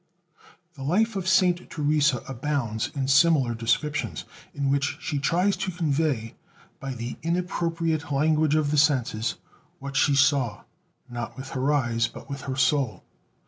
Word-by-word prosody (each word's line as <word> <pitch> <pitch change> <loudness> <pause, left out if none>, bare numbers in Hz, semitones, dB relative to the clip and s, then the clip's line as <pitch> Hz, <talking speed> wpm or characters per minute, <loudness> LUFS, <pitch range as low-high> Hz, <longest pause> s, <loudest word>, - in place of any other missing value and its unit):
The 140 - -12
Life 205 +10 +1
of 190 -2 -3
Saint 180 -1 +3
Teresa 150 -4 +1
abounds 130 -4 -2
in 135 -2 -1
similar 135 -3 +4
descriptions, 115 - -1 0.3
in 140 -1 -1
which 140 +1 0
she 145 -2 -2
tries 180 +7 +2
to - - -2
convey, 150 -9 -1 0.5
by 135 -1 -5
the 120 +1 -5
inappropriate 165 -2 -1
language 155 +1 +2
of 150 -2 +1
the 150 - +3
senses, 125 -6 +1 0.4
what 140 0 -7
she 145 0 +3
saw, 135 -6 +2 0.4
not 120 0 -6
with 130 0 -7
her 135 +2 0
eyes, 120 -5 +1
but - - -12
with 140 0 -5
her 130 - -2
soul. 130 -2 +1
145 Hz, 145 wpm, -25 LUFS, 130-160 Hz, 0.5 s, similar